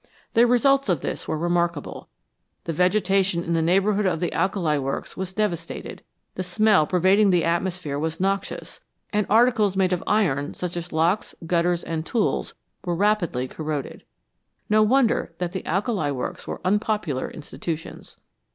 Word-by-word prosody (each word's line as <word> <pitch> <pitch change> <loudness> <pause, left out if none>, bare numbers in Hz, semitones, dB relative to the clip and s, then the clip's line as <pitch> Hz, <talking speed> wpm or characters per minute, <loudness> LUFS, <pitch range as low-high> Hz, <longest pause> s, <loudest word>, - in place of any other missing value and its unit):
The 235 +2 +5
results 275 +1 +3
of 170 -6 +1
this - - -4
were - - -1
remarkable; 170 -2 -1 0.5
the 165 - -3
vegetation 185 0 +2
in 170 - -2
the 165 - +2
neighbourhood 195 +4 +2
of 175 - 0
the 175 - -2
alkali 170 -7 +1
works 135 0 -4
was 190 0 -4
devastated; 185 -5 -3 0.3
the - - -4
smell 185 -2 +3
pervading 190 +3 +4
the 175 -3 +3
atmosphere 170 -3 -1
was 160 +1 -3
noxious, 195 +1 -2 0.3
and 210 -1 +1
articles 220 -3 +3
made 185 -1 +2
of 180 - -2
iron, 145 -10 +1
such 180 -1 -4
as 175 0 -5
locks, 165 +6 0
gutters, 175 0 +1
and 160 -1 -3
tools, 225 +7 -1 0.3
were 175 -2 -1
rapidly 175 -10 +1
corroded. 150 -1 -5 0.7
No 215 0 +5
wonder 225 -6 +2
that 180 -1 -3
the 190 - -5
alkali 195 - 0
works 130 -3 -5
were - - -5
unpopular 205 -8 0
institutions. 160 +1 -7
180 Hz, 150 wpm, -24 LUFS, 165-205 Hz, 0.7 s, The